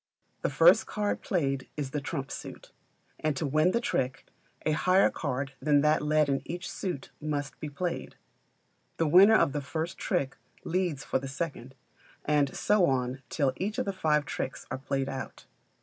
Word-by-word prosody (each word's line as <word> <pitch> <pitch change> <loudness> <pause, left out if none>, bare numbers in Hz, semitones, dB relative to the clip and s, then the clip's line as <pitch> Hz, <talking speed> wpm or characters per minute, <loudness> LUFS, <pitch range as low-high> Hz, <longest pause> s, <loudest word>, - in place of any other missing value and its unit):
The - - 0
first - - +5
card 210 -1 -1
played 135 -8 -1
is 140 -3 -3
the 150 - -2
trump 140 -1 -4
suit; - - -8 0.5
and 155 -3 0
to 155 - -1
win 155 +5 +3
the 235 - +1
trick, 130 - -1 0.4
a 155 - +2
higher 185 +5 +4
card 135 -2 -3
than 145 0 +4
that 150 +1 +3
led 150 0 +3
in 135 -1 0
each 175 +4 -5
suit 175 -9 -4
must 145 -2 -3
be 150 - -5
played. 170 +4 -4 0.8
The 165 - +2
winner 190 +8 +8
of 145 - +4
the 145 - -2
first 160 +5 -4
trick 140 -9 -1 0.3
leads 170 -5 -1
for - - 0
the 135 - -6
second, 135 -3 -5 0.5
and 145 -2 +2
so 205 -4 +3
on 130 0 -1
till 140 -4 +1
each 205 +3 -2
of - - 0
the 200 - -2
five 150 -5 +1
tricks 130 - -4
are - - -3
played 135 0 -2
out. 135 -1 -6
150 Hz, 180 wpm, -29 LUFS, 135-175 Hz, 0.8 s, winner